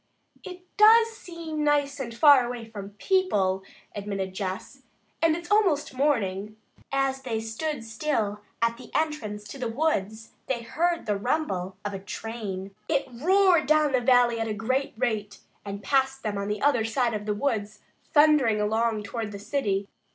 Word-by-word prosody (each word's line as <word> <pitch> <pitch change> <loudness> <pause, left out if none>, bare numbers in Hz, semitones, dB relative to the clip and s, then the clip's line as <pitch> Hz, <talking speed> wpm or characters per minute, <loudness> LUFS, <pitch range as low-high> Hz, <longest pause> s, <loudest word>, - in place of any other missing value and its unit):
"It 365 -1 -9
does 450 +2 +7
seem 335 -7 -5
nice 290 -1 +1
and 245 -3 -4
far 280 +2 +6
away 240 -1 -5
from 205 -2 -9
people," 205 - +1 0.3
admitted 195 -2 -4
Jess, 190 +7 -5 0.4
"and 325 -1 +4
it's 345 +3 -8
almost 375 -11 +2
morning." 215 -7 0 0.3
As 270 -1 0
they 235 -4 -2
stood 230 +5 -4
still 220 -3 -2 0.2
at 230 0 +1
the 245 -2 -12
entrance 270 -10 -1
to 270 +6 -10
the 250 - -2
woods, 225 -5 -1 0.2
they 240 -3 -2
heard 340 +7 0
the 210 -2 0
rumble 195 - -2
of 205 - -3
a 195 - -4
train. 200 -2 -6 0.2
It 285 -3 +1
roared 350 +5 +3
down 305 -1 +4
the 255 -2 +2
valley 245 -2 +4
at 225 - -1
a 215 - -2
great 255 +6 -1
rate 210 -3 -2 0.3
and 200 0 -6
passed 270 -1 +1
them 210 -2 -2
on 200 0 -3
the 210 0 -3
other 275 -6 +3
side 230 +1 0
of 210 0 -4
the 210 - 0
woods, 215 -4 -2 0.3
thundering 295 -8 +5
along 220 +1 0
toward 215 +1 -4
the 200 - -6
city. 205 -3 -1
235 Hz, 165 wpm, -26 LUFS, 210-295 Hz, 0.4 s, does